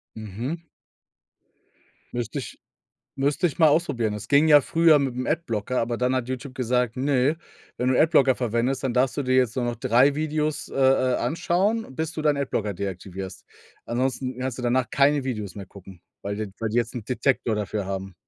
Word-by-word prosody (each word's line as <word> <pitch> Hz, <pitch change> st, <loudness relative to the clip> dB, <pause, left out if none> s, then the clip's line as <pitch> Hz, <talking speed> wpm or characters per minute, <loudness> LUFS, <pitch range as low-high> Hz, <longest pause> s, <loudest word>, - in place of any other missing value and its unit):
Mhm. 115 Hz, -, -5 dB, 1.5 s
Müsste 120 Hz, +3 st, -3 dB
ich -, -, -9 dB, 0.6 s
müsste 145 Hz, +6 st, 0 dB
ich 170 Hz, +1 st, -1 dB
mal 160 Hz, -, +7 dB
ausprobieren. 120 Hz, -9 st, +1 dB
Es 105 Hz, +2 st, -8 dB
ging 145 Hz, +2 st, +4 dB
ja 150 Hz, -1 st, +8 dB
früher 165 Hz, -1 st, +4 dB
mit 135 Hz, -3 st, -1 dB
'm 130 Hz, -, -3 dB
Adblocker, 125 Hz, -7 st, -1 dB
aber 115 Hz, 0 st, -1 dB
dann 125 Hz, +1 st, +1 dB
hat 125 Hz, -1 st, -2 dB
YouTube 130 Hz, +1 st, -5 dB
gesagt: 125 Hz, -1 st, 0 dB
„Ne, 140 Hz, +3 st, +1 dB, 0.4 s
wenn 125 Hz, +1 st, 0 dB
du 130 Hz, -, +2 dB
Adblocker 140 Hz, -5 st, +4 dB
verwendest, 120 Hz, +3 st, -1 dB
dann 130 Hz, -3 st, -1 dB
darfst 130 Hz, +2 st, +1 dB
du 145 Hz, -, 0 dB
dir 130 Hz, 0 st, +1 dB
jetzt 125 Hz, -2 st, +2 dB
nur 125 Hz, -2 st, -1 dB
noch 120 Hz, 0 st, -2 dB
3 130 Hz, +4 st, +3 dB
Videos, 155 Hz, 0 st, -2 dB
äh, -, -, -11 dB
äh, 130 Hz, -1 st, +3 dB
anschauen, 185 Hz, -, 0 dB
bis 160 Hz, 0 st, -2 dB
du 155 Hz, -, -4 dB
deinen 150 Hz, -2 st, +3 dB
Adblocker 110 Hz, -7 st, -2 dB
deaktivierst.“ 95 Hz, 0 st, -6 dB, 0.4 s
Ansonsten 130 Hz, +1 st, -2 dB
kannst 130 Hz, -1 st, -3 dB
du -, -, -5 dB
danach 120 Hz, 0 st, +1 dB
keine 140 Hz, 0 st, +3 dB
Videos 105 Hz, -7 st, -4 dB
mehr 100 Hz, -2 st, -7 dB
gucken, 95 Hz, -3 st, -14 dB, 0.2 s
weil 100 Hz, 0 st, -3 dB
d 110 Hz, 0 st, -3 dB
weil 110 Hz, -1 st, -1 dB
die 115 Hz, -, -1 dB
jetzt 120 Hz, +1 st, -1 dB
'n 115 Hz, -, -5 dB
Detektor 125 Hz, -3 st, 0 dB
dafür 105 Hz, -1 st, -3 dB
haben. 95 Hz, -1 st, -5 dB
130 Hz, 190 wpm, -24 LUFS, 115-140 Hz, 1.5 s, ja